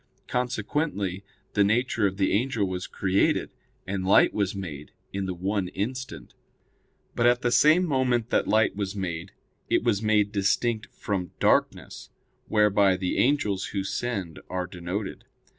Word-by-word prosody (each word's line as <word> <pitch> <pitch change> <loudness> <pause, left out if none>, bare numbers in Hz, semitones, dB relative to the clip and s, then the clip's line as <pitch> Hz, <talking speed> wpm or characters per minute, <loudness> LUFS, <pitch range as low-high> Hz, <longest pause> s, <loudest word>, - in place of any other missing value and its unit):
Consequently, 125 - -2 0.3
the 105 - +4
nature 115 0 +2
of 95 0 -5
the 95 - +1
angel 115 0 +1
was 90 0 -4
created, 95 0 +1 0.3
and 95 0 -3
light 95 - +5
was 100 -2 -1
made, 75 -7 -7 0.2
in 95 -1 -2
the 95 - -2
one 95 +2 -1
instant. 125 +8 -5 0.8
But 120 - +3
at 120 0 +3
the 120 - +2
same 155 +8 +5
moment 125 -6 0
that - - +2
light 110 -2 +3
was 100 -1 -3
made, 90 -1 -4 0.4
it - - +2
was 110 -4 +1
made 105 -2 +2
distinct 110 +3 0
from 95 -4 -4
"darkness," - - 0 0.4
whereby 100 -3 +3
the 90 -1 -2
angels 105 -8 +1
who 100 -2 -3
sinned 95 -5 -3
are 90 0 -2
denoted. 90 +3 -5
100 Hz, 145 wpm, -26 LUFS, 95-120 Hz, 0.8 s, light